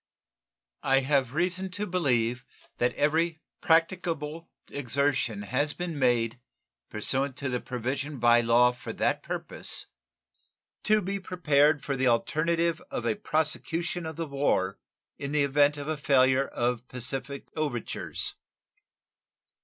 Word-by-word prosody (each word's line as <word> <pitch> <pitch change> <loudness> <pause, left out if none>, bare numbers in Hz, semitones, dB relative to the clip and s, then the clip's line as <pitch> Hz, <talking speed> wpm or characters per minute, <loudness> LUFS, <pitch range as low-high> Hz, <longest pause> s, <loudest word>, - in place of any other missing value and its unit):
I 135 0 +3
have 135 -1 +1
reason 185 +3 0
to 210 - -1
believe 125 - +1 0.4
that 125 - +1
every 160 +2 +1 0.2
practicable 165 -2 +1 0.2
exertion 135 -5 0
has 135 +7 0
been 170 -3 -4
made 120 -2 +2 0.5
(pursuant 130 +5 -1
to 135 0 -3
the 125 -1 -1
provision 135 +4 -3
by 120 0 +5
law 120 +1 +5
for 120 - -8
that - - 0
purpose) - - -2 1.0
to 215 0 +4
be 195 +2 -2
prepared 150 -5 +2
for 140 - -1
the 130 0 +1
alternative 165 +7 +1
of 120 - -4
a 115 -2 +1
prosecution 160 +4 -1
of 160 - -6
the 165 - -3
war 135 -10 0 0.4
in 140 +1 -4
the 150 -1 +3
event 145 +1 +3
of 145 0 -5
a 155 -1 -1
failure 135 -2 +3
of 120 0 -2
pacific 135 +2 -5
overtures. 145 -7 -2
140 Hz, 130 wpm, -28 LUFS, 125-160 Hz, 1.0 s, by